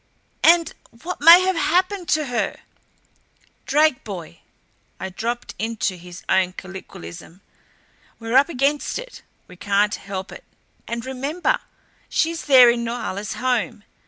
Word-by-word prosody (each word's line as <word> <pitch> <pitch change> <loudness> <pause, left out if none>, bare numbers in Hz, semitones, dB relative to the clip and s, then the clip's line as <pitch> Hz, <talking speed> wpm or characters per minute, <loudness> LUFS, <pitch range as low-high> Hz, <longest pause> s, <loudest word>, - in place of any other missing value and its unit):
And 335 -1 +5 0.3
what 360 -2 -5
may 335 +4 +10
have 375 0 +1
HAPPENED 365 +3 0
to 305 -1 +2
her?" 245 -3 -2 1.1
"Drake, 300 -2 +3
boy" 175 - -8 0.6
I 190 - -4
dropped 235 +6 -4
into 220 -3 -2
his 175 0 -12
own 185 -1 +2
colloquialism 185 - -10 0.8
"we're 225 +1 -4
up 275 +4 +5
against 280 0 0
it. - - -9 0.3
We 180 - -14
can't 205 +1 +1
help 190 -1 -6
it. - - -11 0.4
And 235 0 -4
remember 285 - -1 0.5
she's 330 0 -1
there 255 -4 +8
in 235 0 -2
Norhala's 220 -3 -4
home. 245 -4 -1
240 Hz, 130 wpm, -22 LUFS, 200-310 Hz, 1.1 s, may